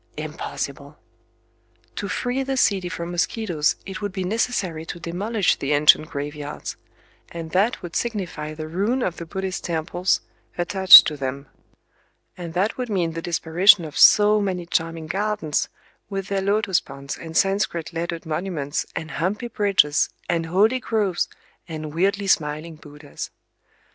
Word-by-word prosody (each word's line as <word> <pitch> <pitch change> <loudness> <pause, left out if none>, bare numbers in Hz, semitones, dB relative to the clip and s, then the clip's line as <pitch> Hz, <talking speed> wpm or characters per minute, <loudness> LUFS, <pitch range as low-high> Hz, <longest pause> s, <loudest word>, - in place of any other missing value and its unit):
Impossible! - - -6 1.0
To - - -3
free 250 +2 -2
the 270 0 -2
city 190 -7 +2
from 170 0 -5
mosquitoes 175 -3 0
it 195 +1 -7
would 205 -1 -3
be 190 0 -3
necessary 185 -5 -1
to 165 +1 -7
demolish 195 +5 0
the 140 +1 -1
ancient 150 +1 +5
graveyards;—and 150 +3 -8
that 200 +7 +1
would 175 -1 -7
signify 180 -9 -3
the 155 0 -6
ruin 205 +10 0
of 175 - -2
the 170 - -7
Buddhist 190 +1 -4
temples 175 +2 0 0.4
attached 185 +1 +9
to 150 - -3
them;—and 140 +5 -10
that 195 +5 0
would 250 -2 -3
mean 180 -5 0
the 165 +1 -5
disparition 175 +3 +4
of 150 - -9
so 210 0 +6
many 185 -3 -2
charming 165 -1 -2
gardens, 195 -2 -1 0.4
with 195 -1 -4
their 195 -1 0
lotus 200 -2 +1
ponds 140 0 -8
and 160 -1 -6
Sanscrit 195 -4 0
lettered 170 0 -4
monuments 155 -3 -3
and 160 - -5
humpy 205 +9 -2
bridges 195 -9 +2 0.2
and 165 -1 -1
holy 210 +9 +3
groves 210 -7 -1 0.4
and 155 -2 -6
weirdly 200 +4 +1
smiling 155 -2 0
Buddhas! 150 -1 -9
175 Hz, 140 wpm, -23 LUFS, 160-200 Hz, 1.0 s, attached